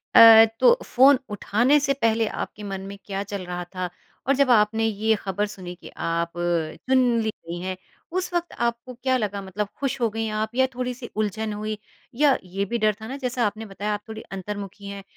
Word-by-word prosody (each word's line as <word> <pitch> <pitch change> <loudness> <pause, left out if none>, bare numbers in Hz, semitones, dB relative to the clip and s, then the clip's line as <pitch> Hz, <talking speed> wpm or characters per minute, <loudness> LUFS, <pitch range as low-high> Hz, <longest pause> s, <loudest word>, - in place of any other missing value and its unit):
अ, 225 -1 +11
तो 485 0 +6
फ़ोन 265 +1 +5
उठाने 240 +8 +3
से 275 -1 +1
पहले 225 0 +2
आपके 210 - -5
मन 195 -1 -4
में 200 - -8
क्या 195 0 -3
चल 200 -2 -6
रहा 180 0 -4
था? 185 -1 -2 0.4
और 275 - +5
जब 275 -1 +3
आपने 220 0 +4
ये 220 0 +1
ख़बर 205 +1 -1
सुनी 185 -3 -8
कि 175 - -12
आप 170 0 -1 0.6
चुन 265 0 +4 0.2
ली 220 - 0 0.2
गई 170 +1 -5
हैं, 185 0 -3 0.4
उस 360 0 -2
वक़्त 345 0 -1
आपको 235 +1 -2
क्या 260 +2 0
लगा 205 -4 -2
मतलब 195 +2 -3
खुश 275 -1 -1
हो 230 - +3
गई 225 +1 -3
आप 220 +2 -3
या 260 0 +4
थोड़ी-सी 250 -1 -4
उलझन 215 0 -1
हुई। 215 +1 -4 0.4
या 285 -1 +4
ये 195 +2 -3
भी 235 +4 -2
डर 215 -2 +3
था 220 - -6
ना 265 +3 -5
जैसा 245 -1 0
आपने 215 +2 -3
बताया 205 +1 -3
आप 205 - -3
थोड़ी 220 0 -6
अंतर्मुखी 200 +1 -6
हैं, 200 0 -7
215 Hz, 205 wpm, -24 LUFS, 200-245 Hz, 0.6 s, अ